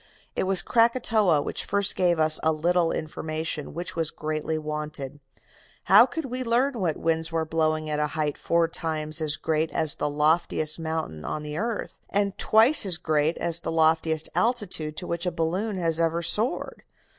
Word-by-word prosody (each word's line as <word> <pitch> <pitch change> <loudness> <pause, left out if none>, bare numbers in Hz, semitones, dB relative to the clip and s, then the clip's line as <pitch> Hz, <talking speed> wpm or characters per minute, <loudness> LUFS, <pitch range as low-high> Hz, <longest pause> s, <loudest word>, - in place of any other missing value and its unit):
It - - 0
was 190 -1 0
Krakatoa 230 - +2
which - - -2
first 200 0 0
gave 175 -3 +2
us 155 0 +4
a 160 - +2
little 170 +2 +1
information 155 -1 -4
which 175 +1 -5
was 165 -2 0
greatly 155 +1 -3
wanted. 150 -2 -5 0.6
How - - +7
could 325 -3 -5
we 255 0 -4
learn 250 +4 +1
what 170 -5 -1
winds 160 0 0
were 165 -1 -1
blowing 155 -1 0
at 150 -1 -2
a 150 - +1
height 150 -2 0
four 170 0 +1
times 155 -1 -3
as 150 -1 -1
great 160 0 -1
as 155 -2 +1
the 150 - -1
loftiest 155 +1 +1
mountain 160 - -4
on 150 - -4
the 150 0 -6
earth, 230 -1 -4
and 200 -1 0
twice 230 +7 +5
as 185 -4 +2
great 155 -1 0
as 170 -1 0
the - - -4
loftiest 160 -1 +2
altitude 200 -10 -1
to 180 - -4
which 170 +1 -3
a - - +1
balloon 185 +6 -2
has 165 -2 +1
ever 165 +1 0
soared? 215 +9 0
160 Hz, 180 wpm, -25 LUFS, 155-185 Hz, 0.6 s, How